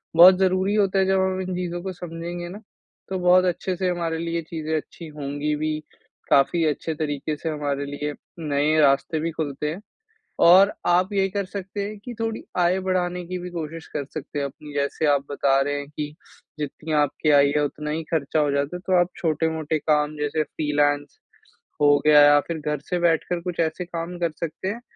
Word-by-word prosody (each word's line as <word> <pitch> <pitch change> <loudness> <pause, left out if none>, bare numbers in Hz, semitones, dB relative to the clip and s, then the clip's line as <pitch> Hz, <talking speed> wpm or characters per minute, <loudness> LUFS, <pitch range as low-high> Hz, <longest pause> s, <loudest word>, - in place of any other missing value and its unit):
बहुत 180 +2 +9
ज़रूरी 190 +1 +2
होता 195 -2 +2
है 190 - +3
जब 190 0 +3
हम 190 0 0
इन 185 -1 -3
चीज़ों 175 -1 -3
को 190 - -3
समझेंगे 175 0 -6
ना, 195 +4 -8 0.5
तो 190 -1 -2
बहुत 180 +1 +5
अच्छे 180 +1 -1
से 185 0 0
हमारे 170 -2 -1
लिए 170 0 -3
ये 170 - 0
चीज़ें 160 -1 -3
अच्छी 165 +2 -8
होंगी 145 +1 -2
भी, 155 0 -2 0.5
काफ़ी 160 +4 +4
अच्छे 155 +1 -1
तरीके 150 -1 -2
से 160 - -4
हमारे 145 -2 -2
लिए 145 +1 -4 0.3
नए 150 0 +1
रास्ते 140 +2 +3
भी 165 +2 -2
खुलते 150 -2 -3
हैं। 170 +6 -6 0.7
और 190 +4 +7
आप 180 +3 +3
ये 195 -1 +2
कर 200 +1 -2
सकते 195 +1 -6
हैं 210 +1 -6
कि 245 - -5
थोड़ी 225 -1 -2 0.2
आय 180 +2 +3
बढ़ाने 180 -1 0
की 185 +1 -3
भी 180 0 -6
कोशिश 165 -1 -6
कर 145 - -1
सकते 150 -1 -5
हैं 140 - -1
अपनी, 150 +2 -9
जैसे 140 +2 -1
आप 140 -1 +2
बता 135 -1 +2
रहे 145 +1 0
हैं 145 - -7
कि 150 0 -6 0.4
जितनी 150 +2 -5
आपकी 145 +2 0
आय 140 0 +6
है 150 - +2
उतना 150 +1 -4
ही 160 +2 -2
खर्चा 155 -1 0
हो 145 -1 +2
जाता 140 +4 -1
है, - - -13
तो 185 -1 +4
आप 175 - +3
छोटे-मोटे 160 -1 0
काम 150 0 +1
जैसे 150 +1 0
फ्रीलांस 145 -1 -1 0.6
हो 145 0 +6
गया 150 -1 +8
या 145 0 +7
फिर 170 - -3
घर 150 -1 -1
से 180 -1 0
बैठकर 170 +1 +1
कुछ 180 -1 -5
ऐसे 165 +2 -1
काम 170 0 -5
कर 170 -2 0
सकते 165 +3 -4
हैं, 230 +4 -5
160 Hz, 205 wpm, -24 LUFS, 150-180 Hz, 0.7 s, बहुत